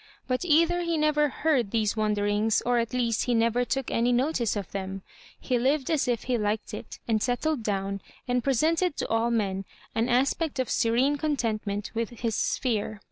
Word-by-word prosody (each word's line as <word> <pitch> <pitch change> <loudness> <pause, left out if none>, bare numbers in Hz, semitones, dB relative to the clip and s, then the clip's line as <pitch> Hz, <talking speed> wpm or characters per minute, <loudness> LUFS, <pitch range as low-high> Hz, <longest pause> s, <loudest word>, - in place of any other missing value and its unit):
But 255 +3 0
either 335 +1 +3
he 335 -1 0
never 300 -1 +2
heard 270 -7 +1
these 215 -1 0
wonderings, 210 0 +1
or 245 0 +3
at 230 -1 -1
least 235 -3 0
he 245 - +1
never 230 +2 +2
took 270 +1 -2
any 235 +2 +2
notice 245 -3 +1
of 200 -3 -5
them. 195 0 -5 0.4
He 250 -2 0
lived 270 +4 +1
as 305 -5 +1
if 240 -2 0
he 250 -2 0
liked 210 +1 -2
it, 210 - -7
and 220 -2 +1
settled 255 +4 0
down, 195 -2 -2 0.3
and 245 -1 +1
presented 315 +6 +1
to - - -2
all 225 +1 +2
men 195 -4 0 0.3
an 230 +3 0
aspect 275 +5 +1
of 260 -2 -1
serene 250 +6 +2
contentment 220 -9 -2
with 230 -1 -1
his 230 -2 0
sphere. 215 -4 -1
240 Hz, 185 wpm, -27 LUFS, 215-275 Hz, 0.4 s, either